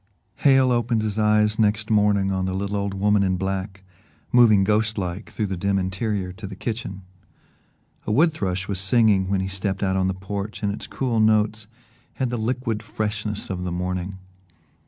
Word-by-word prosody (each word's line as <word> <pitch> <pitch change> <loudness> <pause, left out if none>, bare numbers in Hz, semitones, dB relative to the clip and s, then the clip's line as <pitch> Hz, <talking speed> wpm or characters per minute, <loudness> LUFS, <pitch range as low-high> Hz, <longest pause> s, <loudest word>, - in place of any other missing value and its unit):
X - - -16
Hale 135 -2 +5
opened 120 -2 +1
his 110 0 -2
eyes 105 0 +3
next 110 0 +1
morning 100 -2 +3
on 95 -1 -1
the 95 0 -2
little 100 +1 -2
old 100 -1 -2
woman 105 +1 +2
in 95 -2 +1
black, 95 0 -4 0.5
moving 110 -5 +6
ghost 105 +2 +1
like 95 +2 -4
through 110 - -2
the 95 -1 -3
dim 100 +2 0
interior 95 0 -2
to 100 +2 -8
the 95 - -8
kitchen. 100 -3 -5 1.0
A - - 0
wood 160 +9 +4
thrush 95 -9 -3
was 100 -2 -1
singing 95 -1 +3
when 95 -1 +1
he 95 - -2
stepped 95 +1 -3
out 95 -1 +1
on 95 0 +1
the 95 - -1
porch 100 +3 -5
and 100 -1 0
its - - -7
cool 125 -4 -1
notes 110 0 +2 0.5
had 130 -2 -1
the 120 - -1
liquid 115 -1 -2
freshness 105 -1 -4
of 90 -1 -3
the 90 - -3
morning. 90 +2 -3
100 Hz, 190 wpm, -23 LUFS, 95-110 Hz, 1.0 s, moving